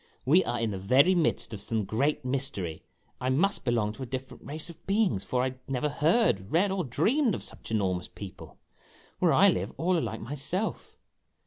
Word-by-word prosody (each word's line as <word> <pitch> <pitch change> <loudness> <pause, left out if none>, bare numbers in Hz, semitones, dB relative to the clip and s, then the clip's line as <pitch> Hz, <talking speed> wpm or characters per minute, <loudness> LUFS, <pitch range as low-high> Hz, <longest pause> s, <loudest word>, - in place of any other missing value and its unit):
"We 165 +8 +5
are 120 - -1
in 115 -2 0
the 95 - -4
very 130 - +5
midst 150 -9 0
of 100 - -6
some 110 0 -1
great 135 +8 0
mystery. 125 - -2 0.4
I 130 - -1
must 190 +10 +2
belong 115 -4 +1
to 135 - -11
a 130 - -4
different 130 +1 -6
race 155 +3 -4
of 170 - -13
beings 195 - +2
for 125 +5 0
I 130 0 -2
never 135 +2 -1
heard, 150 - +2
read, 190 +4 +3
or 190 -2 0
dreamed 215 - +2
of - - -7
such - - -8
enormous 95 -5 0
people. 100 -3 -10 0.6
Where - - +4
I - - +6
live, 95 +3 +1
all 180 +2 +1
are 165 - +2
like 110 - -4
myself! 145 - -3
130 Hz, 195 wpm, -28 LUFS, 110-170 Hz, 0.6 s, I